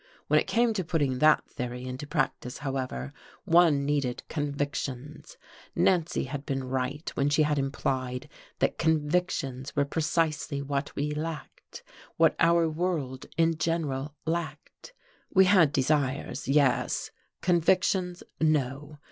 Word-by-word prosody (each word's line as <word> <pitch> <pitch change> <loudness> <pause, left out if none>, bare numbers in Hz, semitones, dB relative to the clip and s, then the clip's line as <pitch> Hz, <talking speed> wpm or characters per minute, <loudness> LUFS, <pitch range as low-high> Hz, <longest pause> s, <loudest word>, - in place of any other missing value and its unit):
When - - +4
it - - -3
came 235 0 +2
to 195 -3 -1
putting 145 -6 0
that 155 +1 +5
theory 125 0 -5
into 130 +3 -6
practice, 125 -3 -2
however, 130 - -3 0.3
one 165 -5 +4
needed 140 -4 -1
convictions: 145 - -4 0.4
Nancy 175 -3 +2
had 135 +1 -5
been 135 -2 -2
right 130 +4 -3
when 140 +1 +1
she 150 +1 +3
had 150 -1 +1
implied 130 -2 -2 0.3
that - - 0
convictions 150 -4 0
were 145 -1 +2
precisely 155 -2 -1
what 140 +1 -3
we 150 +1 -1
lacked; 155 +1 -7 0.3
what 165 -1 +4
our 170 0 +4
world 155 -6 -2
in 165 -1 +3
general 150 -4 -1
lacked. 160 - -5 0.4
We 190 0 +7
had 185 -6 +5
desires, 140 -1 0
yes 140 -1 +2 0.3
convictions, 180 +1 +2 0.2
no. 150 -1 0
150 Hz, 125 wpm, -28 LUFS, 135-165 Hz, 0.4 s, We